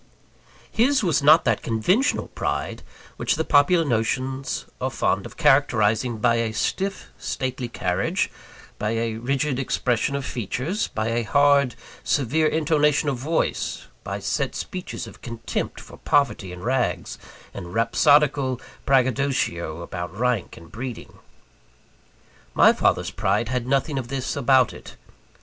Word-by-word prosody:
His 255 +2 +2
was 165 -7 +2
not 155 +4 +6
that 115 -4 +1
conventional 180 - +1
pride, - - -3 0.4
which - - +1
the 160 - -1
popular 160 +3 +4
notions 130 +2 -1 0.2
are - - 0
fond - - 0
of - - -16
characterising 120 -5 +3
by 115 +1 +2
a 115 -1 -1
stiff, 195 - -2
stately 130 -1 -3
carriage; 90 -6 -1 0.5
by 105 +2 -1
a 115 -1 -1
rigid 135 +3 -1
expression 125 0 0
of 140 -2 -3
features; 130 - -2
by 110 +1 -2
a 115 +1 0
hard, 140 +1 +3 0.3
severe 150 +3 +1
intonation 150 -1 +2
of 135 - -2
voice; 150 +7 -2
by - - -4
set - - -2
speeches 185 -1 -5
of - - -13
contempt 115 -2 -4
for - - -13
poverty 120 -10 +1
and 90 0 -9
rags, 125 +1 -1 0.3
and 85 - -8
rhapsodical 135 +2 +3 0.3
braggadocio 130 - +1
about 90 +2 -6
rank 120 -4 -1
and 85 - -14
breeding. 125 0 -7 1.4
My - - +7
father's - - +1
pride 105 +3 0
had 125 -1 -2
nothing 140 +1 +1
of 125 - -6
this 130 0 -3
about 130 0 +3
it. - - -12
130 Hz, 135 wpm, -23 LUFS, 115-145 Hz, 1.4 s, My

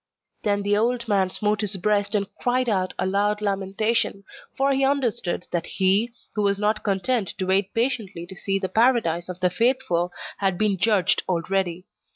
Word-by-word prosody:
Then 205 -1 0
the 205 0 +2
old 235 +2 0
man 195 -3 +2
smote 210 +2 0
his 205 -2 -1
breast, 205 +2 +1
and 200 -1 0
cried 250 +1 0
out 190 -4 0
with - - -1
a - - -1
loud 205 +1 +1
lamentation; 200 +1 0 0.3
for 275 +1 +2
he 270 0 +1
understood 240 -10 0
that 170 -1 -2
he, 195 +5 +2 0.2
who 210 - -1
was 200 -1 +2
not 210 +1 0
content 200 +1 0
to 185 - -2
wait 190 +1 +1
patiently 220 -8 -1
to 190 - -10
see 195 +1 -1
the 195 -1 -2
Paradise 220 -6 +2
of 180 0 -6
the 180 -1 +2
faithful, 205 -6 +1 0.3
had 195 -3 +1
been 210 -1 +1
judged 205 -1 +3
already. 180 0 -1
200 Hz, 185 wpm, -24 LUFS, 190-225 Hz, 0.3 s, judged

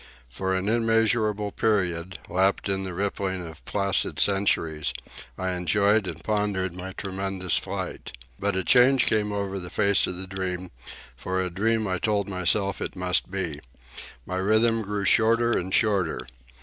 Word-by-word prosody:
For 95 +7 -1
an 95 +1 -1
immeasurable 110 -2 +2
period, 90 -6 0
lapped 95 +3 +1
in 95 -1 -1
the 95 -1 -4
rippling 95 -1 -2
of 80 - -12
placid 100 -1 0
centuries, 85 -6 +1 0.4
I 95 0 -2
enjoyed 100 +4 +2
and 80 -1 -6
pondered 105 -4 -1
my 95 +1 -7
tremendous 95 -2 -2
flight. - - -5 0.3
But 100 -1 0
a 95 - 0
change 125 +4 +5
came 105 -1 +1
over 100 -1 -3
the 90 -1 -7
face 100 0 +3
of 90 - -4
the 95 - -5
dream, 95 -1 -4 0.4
for 95 +9 -3
a 90 -1 -1
dream 110 +4 0
I 95 -1 -1
told 105 -2 0
myself 95 +1 0
it - - -4
must 90 0 +1
be. 90 -6 -3 0.7
My 95 - -3
rhythm 110 +4 +2
grew 105 -1 -3
shorter 115 +2 +4
and 95 -4 -1
shorter. 95 - +1
95 Hz, 155 wpm, -25 LUFS, 90-105 Hz, 0.7 s, change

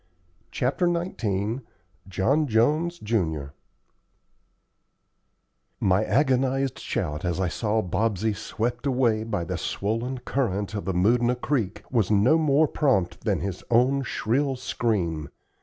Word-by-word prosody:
CHAPTER 140 +8 0
XIX 115 - -2 0.5
JOHN 135 - +1
JONES, 150 +9 +2
JUN 80 - -1 2.3
My 95 +2 +3
agonized 135 0 +1
shout 75 0 -3
as 90 -1 -1
I 95 - +1
saw 110 +1 0
Bobsey 110 +2 0
swept 120 +5 -3
away 120 -5 +2
by 105 -6 -2
the - - -4
swollen 115 +6 -2
current 110 -6 -2
of 105 -4 -4
the 95 - -1
Moodna 120 +6 +3
Creek 120 -8 -1
was 115 -7 +2
no 110 +10 +4
more 155 0 +3
prompt 100 -13 0
than - - +1
his 95 -2 -4
own 125 +4 +3
shrill 135 +2 0
scream. 95 - -1
115 Hz, 120 wpm, -25 LUFS, 100-135 Hz, 2.3 s, no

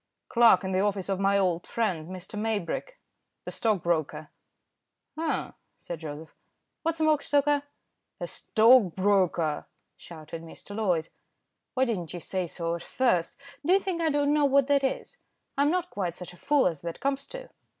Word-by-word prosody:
"Clerk 230 -6 +6
in 190 - -2
the 185 - +1
office 200 -1 0
of 195 -1 0
my 195 0 +3
old 180 -3 0
friend, 185 -9 -1
Mr. 185 +1 -8
Maybrick, 220 - -2 0.5
the - - -5
stockbroker." 165 -7 -1 0.8
"Eh!" 320 0 -2 0.3
said 170 -2 -7
Joseph. 155 0 -8 0.5
"What's 330 0 -1
a - - +2
mockstoker?" 290 -1 +3 0.6
"A - - -3
stockbroker," 195 -8 +3 0.3
shouted 160 0 -9
Mr. 165 +4 -10
Loyd. 180 -7 0 0.7
"Why 260 0 +3
didn't 180 -9 -3
you - - -4
say 185 +1 -3
so 170 0 -3
at 170 - -4
first. 185 -6 0 0.3
Do 345 +5 +3
you 390 - +6
think 370 -3 -3
I 325 - +2
don't 290 0 +2
know 300 -1 +3
what 280 -1 +4
that 280 0 +2
is? 265 - -2 0.4
I'm 280 +1 +3
not 360 +1 -1
quite 180 -4 -2
such 180 0 -9
a - - -15
fool 290 +7 +2
as 165 -5 0
that 170 -1 -6
comes 275 0 -1
to." - - -9
200 Hz, 165 wpm, -28 LUFS, 170-280 Hz, 0.8 s, Clerk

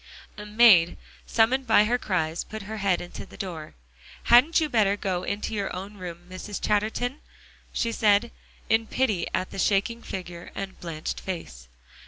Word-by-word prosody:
A 210 0 -8
maid, 210 -6 +6 0.3
summoned 250 +4 +2
by 220 -2 +6
her 240 +3 +1
cries, 170 -6 -1
put 220 -1 -8
her 220 +2 -6
head 195 -3 +1
in 175 - -9
the - - -10
door. 165 -5 -6 0.5
"Hadn't 255 +9 +6
you 315 - +1
better 210 -7 +2
go 185 -3 -2
into 200 +4 -3
your 200 -2 -2
own 195 +3 -7
room, 175 -2 -8
Mrs. 185 +3 -6
Chatterton?" 220 +6 0 0.5
she 230 - -1
said, 215 0 +3 0.4
in 225 0 +2
pity 215 -10 0
at 185 - -2
the - - -6
shaking 205 +5 +1
figure 175 -4 -7
and 195 -1 -6
blanched 160 -3 -5
face. 115 - -7
200 Hz, 165 wpm, -26 LUFS, 180-225 Hz, 0.5 s, maid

